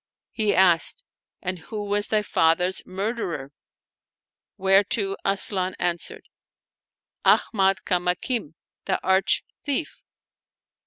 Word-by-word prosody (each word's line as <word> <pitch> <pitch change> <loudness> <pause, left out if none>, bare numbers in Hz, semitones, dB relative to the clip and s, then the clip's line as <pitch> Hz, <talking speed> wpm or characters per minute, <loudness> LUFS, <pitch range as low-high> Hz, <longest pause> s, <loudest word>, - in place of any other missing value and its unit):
He 215 -3 0
asked, 175 -3 +3 0.4
"And 185 0 -3
who 210 +6 -6
was 205 0 0
thy 215 -1 +1
father's 180 0 +1
murderer? 190 - -4 0.5
" - - -69
whereto 195 +2 +2
Asian 190 -1 +2
answered, 175 -1 -3 0.5
" - - -60
Ahmad 195 -3 +3
Kamakim, 180 - -1 0.3
the - - 0
arch 190 +1 +3 0.2
thief." 290 +2 -3
190 Hz, 100 wpm, -24 LUFS, 180-205 Hz, 0.5 s, asked